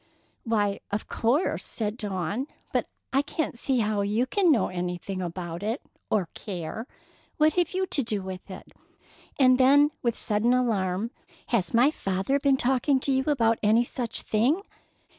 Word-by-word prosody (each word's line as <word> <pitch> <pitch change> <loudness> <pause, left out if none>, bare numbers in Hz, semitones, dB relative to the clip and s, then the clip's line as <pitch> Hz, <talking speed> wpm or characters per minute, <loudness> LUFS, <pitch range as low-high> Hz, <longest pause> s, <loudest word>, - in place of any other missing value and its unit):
"Why, 205 -3 +1
of 205 +1 -3
course," 255 +10 0
said 215 -2 -3
Dawn; 205 - -3 0.3
"but - - +1 0.3
I 270 - +4
can't 285 -4 -3
see 260 -2 +1
how 210 -1 0
you 210 +5 +1
can 360 +5 +3
know 230 -10 +2
anything 180 +1 -4
about 175 -1 -5
it, 220 +5 -1 0.3
or 200 -5 +1
care. 195 +3 -6 0.5
What 310 0 +4
have 355 0 0
you 375 0 +1
to 295 - 0
do 215 -5 -2
with 190 +1 -7
it?" 185 - -10 0.7
And 255 -2 +5
then 285 +3 +6
with 235 -2 0
sudden 225 +3 +2
alarm, 215 -3 0 0.4
"Has 200 -8 +1
my 245 +6 +5
father 195 +3 -1
been 275 -1 +3
talking 265 +2 +2
to 275 - -1
you 265 0 +1
about 230 -6 +2
any 220 +3 +4
such 240 -1 -4
thing?" 260 - +1
230 Hz, 160 wpm, -27 LUFS, 200-265 Hz, 0.7 s, then